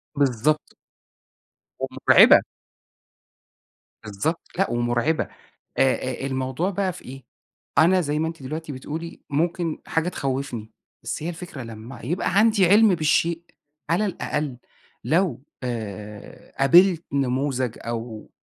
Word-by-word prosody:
بالضبط. 140 +2 +1 1.1
ومُرْعبة. - - +6 1.6
بالضبط، 105 - -2 0.2
لأ 195 - +2
ومُرْعبة 120 +6 +1 0.6
آآ، 135 - +6
آآ، 130 +1 -4
الموضوع 130 +7 -1
بقى 190 -1 -1
في - - -13
إيه؟ 135 +1 -10 0.5
أنا 180 +4 +5
زي 150 -2 -1
ما 160 +1 0
أنتِ 165 -4 -9
دلوقتي 155 +3 -5
بتقولي، 155 +5 -7
ممكن 165 +2 -1
حاجة 165 +2 0
تخوّفني، 130 -8 -3 0.3
بس - - -4
هي 165 - -3
الفكرة 175 -5 -7
لمّا 115 +2 -9
يبقى 175 +9 -1
عندي 215 -4 +5
عِلْم 210 +1 +6
بالشيء، 165 +1 +1 0.5
على 190 +6 +2
الأقل 150 -7 -3 0.5
لو 165 -6 +1 0.2
آآ، 105 -4 -7
قابلت 170 +5 +5
نموذج 130 -2 -1
أو 115 -1 -6
145 Hz, 115 wpm, -24 LUFS, 125-170 Hz, 1.6 s, ومُرْعبة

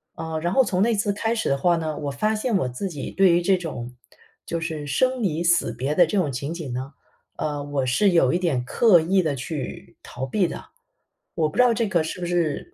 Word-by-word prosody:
呃， 160 -1 -4
然 175 +2 -1
后 265 - +5
从 190 -6 -1
那 230 +1 +3
次 205 0 0
开 225 +3 -1
始 220 - -1
的 140 - +2
话 175 +5 +3
呢， 155 -2 -3
我 145 - -3
发 215 +11 0
现 215 -1 0
我 130 - -1
自 125 +11 -4
己 145 -5 -6
对 190 -1 +4
于 175 - +3
这 190 +1 +3
种， 125 -8 -6 0.5
就 170 - -3
是 155 -3 -4
生 255 - +1
离 170 -2 0
死 170 -9 +2
别 135 +5 -2
的 175 -3 +5
这 205 - -1
种 155 -7 +1
情 140 +6 -4
景 155 -8 -6
呢， 130 +3 -5 0.4
呃， 145 -1 -3
我 140 -2 -2
是 160 +11 +3
有 165 -7 +3
一 175 - +3
点 145 -9 0
刻 210 - +5
意 185 +4 +2
地 150 -3 -1
去 135 +3 -6
逃 125 +2 -6
避 180 +7 +1
的。 - - -7 0.7
我 155 -2 +1
不 - - -14
知 250 - +7
道 245 -2 +4
这 225 -1 0
个， 170 -4 +1
是 160 - -5
不 175 - -3
是 175 - -1
165 Hz, 260 characters per minute, -23 LUFS, 145-195 Hz, 0.7 s, 知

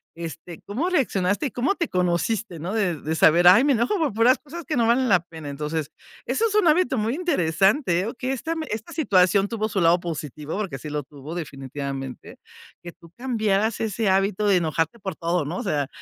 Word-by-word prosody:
Este, 165 0 -8
¿cómo 265 - -2
reaccionaste?, 205 - 0
y, - - -7
¿cómo 270 +10 0
te 335 - -1
conociste, 180 +2 -1
no?, 180 +6 -4
de 195 -7 0
de 160 +2 -3
saber: 170 +2 +5
"Ay, 200 +8 +8
me 285 -1 +3
enojo 235 - +1
por 300 -8 0
puras 230 +4 +4
cosas 320 +3 -9
que 310 - -2
no 230 -1 +3
valen 250 +2 +3
la 185 -2 +5
pena". 160 -4 -9
Entonces, 150 +1 -4 0.3
eso 455 - 0
es 415 - -4
un 420 -5 +4
hábito 310 -4 +3
muy 220 +2 0
interesante, 195 - +1
eh, 220 +5 -3
que 255 0 -2
esta 320 +6 -3 0.2
esta 220 +1 -5
situación 195 - +3
tuvo 220 -1 -2
su 200 - -1
lado 170 0 +4
positivo, 155 -1 -5
porque 185 -11 -4
sí 150 - -7
lo 150 0 -3
tuvo 145 +4 -10
definitivamente, 135 -3 -6 0.5
que 175 - -8
tú 170 -1 -18
cambiaras 220 -4 0
ese 220 -1 -1
hábito 195 +2 +1
de 200 - +4
enojarte 165 +5 -1
por 190 -3 -5
todo, 170 -2 -1
¿no?, 170 +5 -4
o - - -4
sea, 145 -3 -1
195 Hz, 205 wpm, -24 LUFS, 165-235 Hz, 0.5 s, Ay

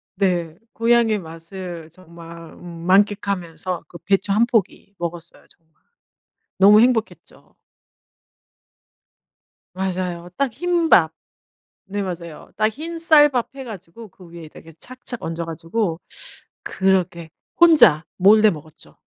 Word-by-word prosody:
네 175 -4 -1 0.2
고향의 230 -2 +2
맛을 165 0 -9
정말 170 -1 -13
음 - - -15 0.2
만끽하면서 185 -3 0
그 170 - -12
배추 195 0 0
1 220 +3 +3
포기 210 -3 -2
먹었어요 170 -1 -7
정말 160 -2 -30 0.8
너무 205 +2 +7
행복했죠. 235 -2 -2 2.2
맞아요. 180 -2 -4
딱 275 -2 0
흰 345 +5 0
밥. 160 - +5 0.7
네 205 0 -4
맞아요. 170 -4 -7
딱 215 +1 +2
흰 325 +7 -7
쌀밥 295 -6 +4
해 270 - -7
가지고 215 -1 -11
그 180 -2 -17
위에다가 165 -1 -12
착착 255 -1 -4
얹어 165 +1 -4
가지고 165 +2 -3 0.6
그렇게 185 -4 -1 0.3
혼자 240 - +6
몰래 215 +3 +6
먹었죠. 155 -3 -11
190 Hz, 225 characters per minute, -21 LUFS, 170-225 Hz, 2.2 s, 너무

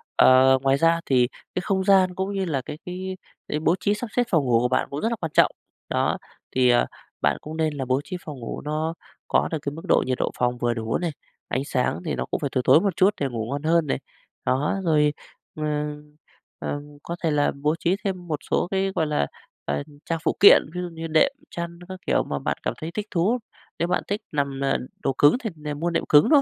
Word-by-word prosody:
ờ, 130 +1 +7
ngoài 135 0 +3
ra 165 +3 +3
thì 125 -2 +3 0.3
cái 185 - 0
không 190 0 0
gian, 190 -2 +4
cũng 190 +2 -2
như 195 -1 -1
là 145 -6 -1
cái - - -6
cái 185 +1 -5 0.3
cái 150 - -1
bố 165 +2 +3
trí 200 +3 +1
sắp 225 +4 -4
xếp 245 - +4
phòng 160 -7 +2
ngủ 120 -2 +4
của 125 - +2
bạn 130 - +1
cũng 140 - -4
rất 225 - +1
là 235 - -1
quan 165 -7 -5
trọng, - - +5 0.4
đó. - - +1 0.4
Thì, 130 -1 +4
ờ, 120 0 +4 0.4
bạn - - +2
cũng 155 +1 -7
nên 160 -1 +1
là 135 -2 -3
bố 130 +2 +1
trí 180 - -5
phòng 145 -4 -7
ngủ 115 - -5
nó 155 +2 -2 0.3
có - - +2
được 160 - 0
cái 140 - -3
mức 160 - -8
độ - - +4
nhiệt 130 -1 -1
độ - - -1
phòng 125 0 +1
vừa 120 -1 +1
đủ 115 -1 -1
này, 175 -2 -2 0.4
ánh 135 - -1
sáng 125 - 0
thì - - -1
nó 65 - -2
cũng - - -2
phải 140 - -2
tối 130 - +2
tối - - +7
một 200 -4 0
chút 195 +3 +4
để 140 - +2
ngủ 115 -3 -3
ngon 140 +1 -3
hơn 165 -1 +3
này, - - 0 0.5
đó. 140 +8 +1
Rồi, 150 -2 +3 0.4
ừm, 150 -1 -3 0.4
ừm, 145 0 -5
có 170 - -4
thể 160 - +2
là 145 -1 +2
bố 150 +2 +2
trí 180 +2 +2
thêm 185 -3 -3
một 155 -3 -2
số - - +2
cái, 195 0 +1
gọi 160 - +1
là, 150 - +1 0.4
ờ, 70 0 -1 0.2
trang 165 -1 -1
phụ - - +1
kiện, 200 - +9
ví 180 - -2
dụ 180 - -3
như 165 -1 -6
đệm, 160 - +4 0.2
chăn, 170 0 -6
các 185 0 -7
kiểu - - +3
mà 70 - -3
bạn - - -2
cảm - - -1
thấy 160 +1 -5
thích 210 +2 -3
thú. 195 +8 +2 0.4
Nếu 170 - +1
bạn - - 0
thích 205 +2 -2
nằm, 140 -2 -1
ờ, 135 - +2 0.3
đồ 135 - +1
cứng 145 - +6
thì 225 - -1 0.2
mua 160 +4 -1
đệm 170 - 0
cứng 145 0 +6
thôi, 295 -2 +7
155 Hz, 245 wpm, -24 LUFS, 135-180 Hz, 0.5 s, kiện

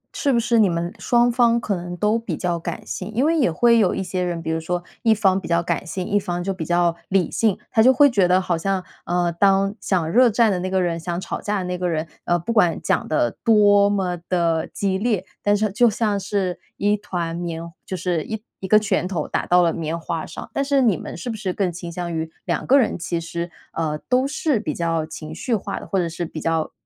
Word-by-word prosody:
是 280 - +1
不 235 - +3
是 235 0 +2
你 200 -4 +5
们 170 +1 -2
双 240 0 +3
方 235 -1 +3
可 205 -4 -2
能 175 0 -6
都 210 +3 +2
比 230 - -4
较 175 -2 -1
感 170 0 -6
性？ 220 - -5
因 260 +5 +2
为 330 +1 +3
也 255 - +2
会 235 +6 +4
有 190 -4 +2
一 195 - -2
些 185 0 -3
人， 170 -2 -2
比 160 - -2
如 160 - 0
说 175 +2 -3 0.2
一 225 - +3
方 195 -2 +2
比 - - -7
较 170 0 +1
感 185 - -2
性， 185 +1 -4
一 205 0 +2
方 175 -2 -3
就 195 +1 -1
比 175 -4 -5
较 175 0 +2
理 190 -4 +1
性。 220 -4 +1
他 220 - +4
就 255 +3 +7
会 285 +2 +6
觉 195 -5 +3
得 180 +1 +4
好 180 -2 -1
像 190 +2 -1 0.2
呃， 175 0 +1
当 195 +3 +3
想 175 -5 0
热 245 +1 +6
战 225 0 +3
的 180 - 0
那 185 +1 -3
个 190 0 +1
人 170 -1 -1
想 170 +1 -3
吵 - - -5
架 210 0 -1
的 - - -3
那 180 0 -3
个 180 -1 0
人， 160 0 -2 0.2
呃 175 - +2
不 200 +8 -3
管 175 -7 +3
讲 - - 0
得 120 -7 +1
多 205 -2 +5
么 190 -3 0
地 170 -3 +1
激 190 -1 -1
烈， 215 -4 0 0.2
但 205 0 +2
是 215 -1 0
就 240 +3 +4
像 210 -2 0
是 190 -2 -2 0.2
一 205 +1 +2
团 170 -5 -4
棉 170 -1 -4 0.2
就 185 - -5
是 175 -4 -1
一 220 -1 -5 0.2
一 190 - -5
个 215 - +6
拳 200 -4 +1
头 170 -6 -3
打 - - -2
到 180 0 +5
了 165 - +2
棉 165 0 -3
花 165 -1 -4
上。 - - -8
但 275 - 0
是 275 -1 +2
你 215 -7 +4
们 - - -7
是 235 +7 -4
不 - - -5
是 190 -3 -3
更 190 -3 0
倾 170 0 -7
向 170 0 -4
于 160 0 -3
两 - - -2
个 275 +2 +6
人 225 -8 +1
其 170 0 -2
实 170 +1 -5 0.2
呃 155 -2 -2
都 255 +2 +3
是 290 -4 0
比 155 -8 -3
较 165 -2 -1
情 155 -1 -8
绪 230 +8 -1
化 195 - -4
的， - - -10
或 195 - -1
者 175 -2 +1
是 170 +1 -5
比 160 -1 -6
较 165 0 -1
185 Hz, 275 characters per minute, -22 LUFS, 170-210 Hz, 0.2 s, 就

